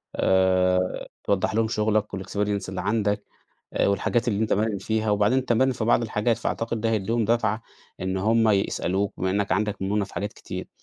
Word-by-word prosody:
آآ، 90 -1 +2 0.2
توضّح 100 +1 0
لهُم 115 0 +2
شُغلك 105 -1 +1
والexperience 100 +1 -2
اللي 95 - -4
عندك، 105 0 0 0.6
والحاجات 120 +4 +1
اللي 105 -2 0
أنت 110 - 0
ماهر 105 0 +1
فيها، 110 +2 -1
وبعدين 105 +5 +3
أنت 130 -2 0
ماهر 130 +3 +3
في 115 - -3
بعض 120 +1 +3
الحاجات، 110 +1 0
فأعتقد 115 0 -2
ده 115 +1 0
هيديهُم 115 +2 0
دَفَعة 110 0 +1 0.4
إن 95 0 -2
هُم 110 +4 +3
يسألوك 100 -1 0
بما 95 - -1
إنّك 100 +1 0
عندك 105 0 -1
مُرونة 100 +1 0
في - - -14
حاجات 100 +3 -3
كتير. - - -7
105 Hz, 175 wpm, -25 LUFS, 95-115 Hz, 0.6 s, وبعدين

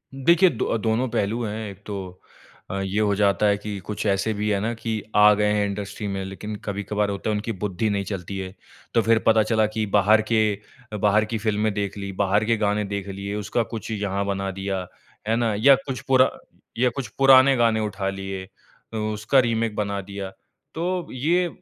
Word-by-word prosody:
देखिए 170 +7 +5
दो 115 -3 -1
दोनों 110 +3 0
पहलू 115 +1 -1
हैं, 105 0 -4
एक 100 +1 -12
तो 95 -3 -7 0.5
अ, 95 - -3
ये 95 +2 -1
हो 105 -1 +2
जाता 100 0 +2
है 100 -1 +3
कि 105 0 -5
कुछ 105 +4 -5
ऐसे 100 +2 +1
भी 105 +1 -2
है 100 -1 +1
ना 115 +3 -1
कि 115 0 -5 0.2
आ 105 0 +7
गए 105 0 +1
है 105 -1 +2
इंडस्ट्री 100 +1 -4
में 95 -1 -3
लेकिन 100 +2 -6
कभी-कभार 100 +1 -1
होता 100 +2 -3
है - - +1
उनकी 110 +2 -3
बुद्धि 105 +1 -1
नहीं 100 -1 0
चलती 95 -1 -5
है। 95 0 -5 0.4
तो 115 - +4
फिर 115 0 +3
पता 110 -1 +5
चला 110 -1 +2
कि 110 -1 0
बाहर 105 +2 +5
के 110 - +4 0.5
अ, - - -2
बाहर 105 +1 +3
की 110 +1 -3
फ़िल्में 105 -1 0
देख 100 0 -3
ली, 100 -1 -5
बाहर 100 +2 +1
के 115 0 +2
गाने 105 +1 +1
देख 100 -1 -3
लिए, 100 +1 -5
उसका 105 +3 -1
कुछ 110 - -6
यहाँ 100 -2 -2
बना 95 -1 -2
दिया, 95 -1 -2 0.4
है 115 - +2
ना? 115 -2 +1
या 135 +7 +6
कुछ 135 -3 -4
पूरा 130 -1 +5 0.5
या 125 +1 +3
कुछ 135 -5 -3
पुराने 135 0 +7
गाने 115 -2 +3
उठा 100 -2 -2
लिए, 95 -1 -5 0.5
उ - - -3 0.2
उसका 110 +6 +2
रीमेक 115 -3 0
बना 100 -1 -2
दिया 100 0 -6 0.5
तो 175 +1 -2
ये 170 +8 +1
105 Hz, 205 wpm, -24 LUFS, 100-115 Hz, 0.5 s, आ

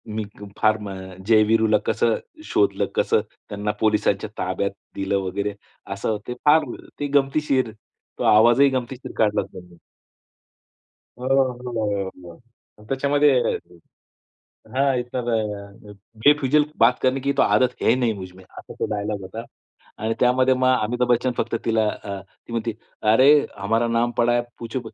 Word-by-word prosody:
मी 110 - -1
क 105 - -9
फार 110 0 +3
म 100 - -5 0.4
जय-वीरूला 110 0 +4
कसं - - +2 0.4
शोधलं? 390 +2 +2
कसं 450 -2 +2 0.3
त्यांना 105 0 -2
पोलिसांच्या 105 -2 +1
ताब्यात 95 +2 -1 0.3
दिलं 100 0 0
वगैरे 100 +2 -2 0.4
असं 105 +2 -2
ते 125 - -3
फार 150 +1 +5 0.3
ते 145 - -1
गमतीशीर. 135 -3 0 0.5
तो - - -1
आवाजही 120 +6 +6
गमतीशीर 130 0 -4
काढला 105 -1 +3
होता - - -10
त्यांनी. 90 -1 -17 1.4
हो, 125 - -4
हो, 120 -7 0 0.2
हो. 85 - -10 0.5
मग 105 - -16
त्याच्यामध्ये 140 +2 +3 1.4
हां 135 0 +2
इतर 120 0 -4 0.6
अ, - - -10 0.3
बेफुजिलकी 145 +1 +4
बात 125 +3 +4
करनी 130 +1 +2
की 140 +1 0
तो 140 - +2
आदत 125 -1 +2
है - - +5
नहीं 120 -3 +1
मुझमे. 95 -1 -10
असा 95 - -12
तो - - +1
डायलॉग 105 0 -3
होता 95 +5 -7 0.6
आणि 115 +1 +1
त्यामध्ये 130 +1 +4
मग 130 0 +3
अमिताभ 125 +3 0
बच्चन 125 +1 +2
फक्त 115 0 -1
तिला 110 -1 +2
अ, 100 -2 -6
ती 95 +4 -19
म्हणते, 115 0 -2 0.4
"अरे 130 +5 +6 0.3
हमारा 115 +4 0
नाम 115 +1 +1
पडा 120 0 +3
है, 120 - +2 0.2
पुछो 115 +2 -4
115 Hz, 145 wpm, -23 LUFS, 105-130 Hz, 1.4 s, आवाजही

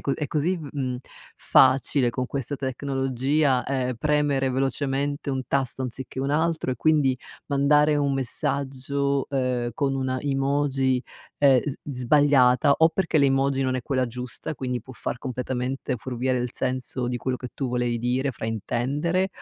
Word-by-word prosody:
co 140 - -1
è 150 - -3
così 165 +5 0
v 155 -4 -7
mhmm, 130 -3 -2 0.4
facile 130 -1 +4
con 125 +1 -3
questa 140 +1 -3
tecnologia, 135 +1 0
ehm, 130 -2 -1
premere 145 0 +1
velocemente 140 +2 -1
un 130 -1 -1
tasto 135 -1 -1
anziché 130 +1 -6
un 135 +1 -1
altro 160 -3 0
e - - -3
quindi 145 -3 +3 0.3
mandare 150 +1 +3
un 140 -1 +1
messaggio, 140 +1 -1
ehm, 125 -3 0
con 135 +2 0
una 130 -1 -1
emoji, 135 -2 +1 0.4
ehm, 135 -3 +5
s 145 - -4
sbagliata, 140 0 +4
o 160 0 +5
perché 170 -2 -1
l'emoji 135 -1 +3
non 130 -1 0
è - - -2
quella 130 -1 0
giusta, 125 +5 -6
quindi 125 -2 -3
può 130 - -12
far 120 - -4
completamente 130 0 -3
fuorviare 125 +2 -2
il 125 0 -2
senso 130 -1 -2
di 125 0 -2
quello 130 +1 -2
che 125 -1 -8
tu 135 -3 -2
volevi 120 -1 -1
dire, 125 +3 0
fraintendere, 135 - -1
135 Hz, 155 wpm, -25 LUFS, 125-140 Hz, 0.4 s, ehm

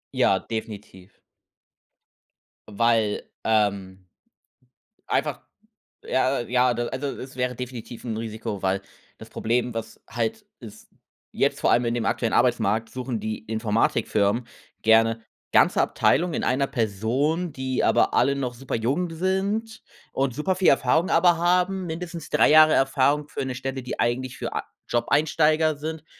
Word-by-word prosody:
Ja, - - +3
definitiv. 105 -4 -8 1.5
Weil, 110 0 +1
ähm 100 -4 0 1.0
einfach - - -1 0.6
ja, 130 0 +1
ja 125 +1 +2
du 120 +1 -3
also, 135 +2 -3
es 130 0 -9
wäre 125 0 -1
definitiv 125 -1 -8
'n 110 -2 -3
Risiko, 110 -3 -5
weil 95 +1 0 0.4
das - - -12
Problem, 120 +2 -1
was 115 0 -6
halt 120 - -3 0.2
ist 110 -2 -12 0.4
jetzt - - 0
vor - - +3
allem 120 - +3
in 115 0 0
dem 115 -2 -2
aktuellen 115 -2 0
Arbeitsmarkt 115 -2 +1
suchen 125 -2 -4
die 110 0 -3
Informatikfirmen 110 0 0 0.4
gerne 115 0 +4 0.3
ganze - - +4
Abteilungen 170 +3 +1
in - - -2
einer 135 +2 +1
Person, 135 - -1
die 130 -2 -2
aber - - +3
alle 140 +2 +3
noch 125 -3 -3
superjung 135 +7 -2
sind 195 +6 -2 0.3
und 135 -3 -1
superviel 185 +5 +1
Erfahrung 140 +6 +3
aber 170 0 +4
haben, 180 +2 +1
mindestens 170 0 -6
3 - - +4
Jahre 155 0 +7
Erfahrung 140 +2 +2
für - - -4
'ne 130 -1 -4
Stelle, 130 +1 -4
die 125 - -6
eigentlich 125 +2 -1
für - - -5
a - - -2 0.2
Jobeinsteiger 155 +4 +2
sind, 155 +1 -6
125 Hz, 135 wpm, -24 LUFS, 115-150 Hz, 1.5 s, Jahre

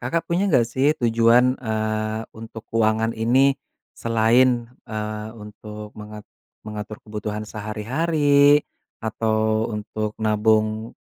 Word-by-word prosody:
Kakak 170 0 -2
punya 175 +3 +1
nggak 120 -2 +4
sih 135 +4 +2
tujuan, 120 +2 +4
eee, 110 -1 -2 0.2
untuk 110 0 -9
keuangan 110 0 +1
ini 130 +5 +3 0.4
selain, 115 +1 +2 0.2
eee, 110 0 -5
untuk 105 -1 -10
mengat 105 0 -10 0.3
mengatur 105 0 -7
kebutuhan 105 0 -5
sehari-hari 145 +7 +2 0.4
atau 110 0 0
untuk 105 0 -4
nabung 110 +1 +1
110 Hz, 105 wpm, -23 LUFS, 110-120 Hz, 0.4 s, nggak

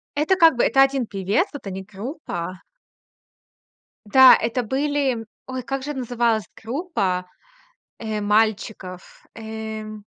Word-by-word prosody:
Это 305 +6 +2
как 330 -6 +6
бы,- - - +3
то 270 - +4
1 270 -2 0
певец. 200 - 0
Вот 280 -7 -9
они- 190 0 -5
группа. 190 - -6 1.4
Да, 260 +5 +8
это 235 +2 -1
были, 280 +3 0
м 225 -1 -6 0.2
ой, 260 -1 -4
как 265 +2 -4
же 295 +1 -4
называлась 235 -4 0
группа, 220 - -2 0.7
э, 220 -2 -3
мальчиков? 210 -3 -1
Эм, 220 -1 -7
225 Hz, 125 wpm, -22 LUFS, 210-270 Hz, 1.4 s, Да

